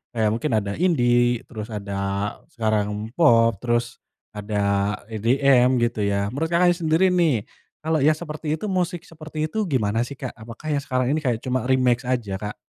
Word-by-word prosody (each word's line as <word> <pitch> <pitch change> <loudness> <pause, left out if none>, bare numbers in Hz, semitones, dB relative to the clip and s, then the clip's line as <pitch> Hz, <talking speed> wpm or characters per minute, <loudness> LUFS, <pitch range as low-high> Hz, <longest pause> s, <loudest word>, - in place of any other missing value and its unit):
kayak 110 -1 +2
mungkin 120 +5 -2
ada 100 -2 -2
indie, 120 -8 +2
terus 110 -2 -7
ada 100 -2 -5 0.5
sekarang 110 -2 -1
pop, 115 -9 +5
terus 120 0 -1 0.4
ada 105 0 -4 0.5
EDM 125 +3 +3
gitu 120 -2 -1
ya. 100 0 0
Menurut 160 +5 -2
Kakaknya 175 +1 +4
sendiri 165 +2 +2
nih, 160 - +2 0.4
kalo 160 0 +1
yang 155 +1 +4
seperti 155 -1 -4
itu 160 - -6
musik 175 -2 -1
seperti 155 -1 -5
itu 220 - 0
gimana 115 -5 0
sih, 140 - -8
Kak? 130 -1 -6
Apakah 115 +6 -10
yang 140 - -1
sekarang 130 -2 0
ini 155 - +1
kayak 120 -4 0
cuma 130 -2 -1
remake 125 -1 +2
aja, 120 -6 -1
Kak? 105 0 -6
125 Hz, 170 wpm, -23 LUFS, 110-155 Hz, 0.5 s, pop